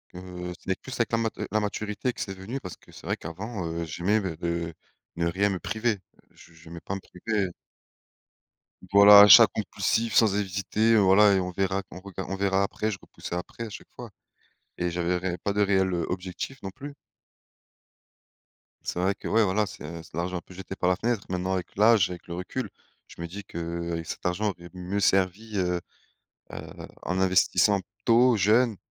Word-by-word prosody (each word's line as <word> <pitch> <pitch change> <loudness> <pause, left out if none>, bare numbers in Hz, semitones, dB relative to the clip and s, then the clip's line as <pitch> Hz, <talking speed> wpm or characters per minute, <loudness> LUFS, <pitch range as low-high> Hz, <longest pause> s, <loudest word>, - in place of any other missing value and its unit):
heu, 90 -1 -7
c'est 95 - -2
plus 130 - -9
avec 115 - -1
la 115 - +2
mat 115 -1 -1 0.2
la 110 - +2
maturité 105 +3 -2
que - - -7
c'est 95 - -3
venu, 100 +8 -6
parce 90 -3 -8
que - - -20
c'est - - -13
vrai - - -1
qu'avant, 95 +4 -6
heu, 85 +1 -3
j'aimais 90 +7 0
me 90 -5 -4
de 85 0 -3 0.4
ne 85 0 +1
rien 95 +4 +1
me 95 -2 -2
priver. 110 0 -1 0.3
Je 80 - -18
j'aimais 80 +1 -11
pas 95 - -5
me 100 - -6
priver 100 +1 -2 1.4
voilà, 100 0 +10
achats 105 -2 +10
compulsifs 115 0 -1
sans 110 -4 +5
hésiter, 105 +3 +1
voilà 100 +1 +6
et 95 - +3
on 90 0 -3
verra 95 +1 0
qu'on 90 - -11
rega 100 -2 -7
on 95 - -3
verra 95 0 +1
après, 110 +2 -2
je 100 - -4
repoussai - - -8
après 90 +6 -6
à - - -7
chaque 100 - -10
fois 120 -3 -9 0.7
et 90 - -1
j'avais 90 +1 0
ré 90 0 -3
pas 100 - -2
de 105 - +1
réel, 95 -2 +2
heu, 85 -2 -1
objectif 90 +8 -5
non 95 - -5
plus. 145 +6 -9 1.9
C'est - - -3
vrai 95 +2 +1
que - - -8
ouais, 115 0 +3
voilà, 105 +2 +1
c'est 85 -3 -8
c'est - - -18
de - - -7
l'argent 90 +1 -2
un - - -6
peut 90 - -16
jeté 95 +1 -8
par 90 - +1
la 90 - +3
fenêtre. 110 +1 -1
Maintenant 90 +1 -1
avec 90 -2 -4
l'âge, 105 -2 +5
avec 90 -1 -9
le 85 - -5
recul, 90 +1 -4 0.4
je - - -12
me 85 - -4
dis 100 +4 -8
qu'avec 85 -1 -4
cet - - -7
argent, 95 +4 0
aurait 85 -1 -13
mieux 90 +2 -3
servi, 95 +3 +1
heu 90 -2 0 0.7
heu, - - -8 0.2
en 90 +2 -2
investissant 95 +2 +3 0.2
tôt, 120 +1 +5
jeune, 110 +3 +3
95 Hz, 195 wpm, -26 LUFS, 90-105 Hz, 1.9 s, voilà